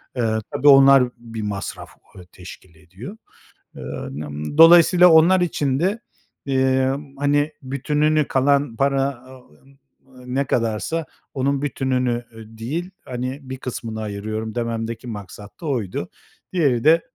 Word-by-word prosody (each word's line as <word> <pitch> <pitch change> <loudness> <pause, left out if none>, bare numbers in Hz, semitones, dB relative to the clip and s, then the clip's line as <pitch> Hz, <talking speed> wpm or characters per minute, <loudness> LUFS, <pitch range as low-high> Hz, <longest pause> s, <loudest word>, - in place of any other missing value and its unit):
eee, 110 -3 0
tabii, 145 - 0
onlar 135 -1 +8
bir 115 -1 -8
masraf, 100 -2 -5 0.3
eee, 90 -2 -12
teşkil 90 -1 -13
ediyor. 95 - -11 0.6
Eee, - - -10 0.3
n 75 +2 -6
m 75 - -6
dolayısıyla 175 +2 +7
onlar 170 +4 +5
için 140 -6 -1
de, 195 +7 0 0.5
eee, 130 -1 +1 0.3
hani 145 +1 +1
bütününü, 150 +3 0
kalan 140 -2 +1
para, 135 +2 +1 0.2
a 130 0 -13
o 125 - -26
m 135 +1 -23 0.5
ne 130 +3 -1
kadarsa 120 +8 -1 0.3
onun 140 +1 -1
bütününü, 130 -4 -1
eee, 110 - -10
değil, 160 +11 -4
hani, 130 +2 -5
bir 130 0 -7
kısmını 115 -4 -6
ayırıyorum 110 +1 -5
dememdeki 115 0 -4
maksat 105 - -10
da - - -7
oydu. 115 -10 -3 0.4
Diğeri 140 -10 +1
de 165 +2 +5
130 Hz, 135 wpm, -21 LUFS, 110-145 Hz, 0.6 s, onlar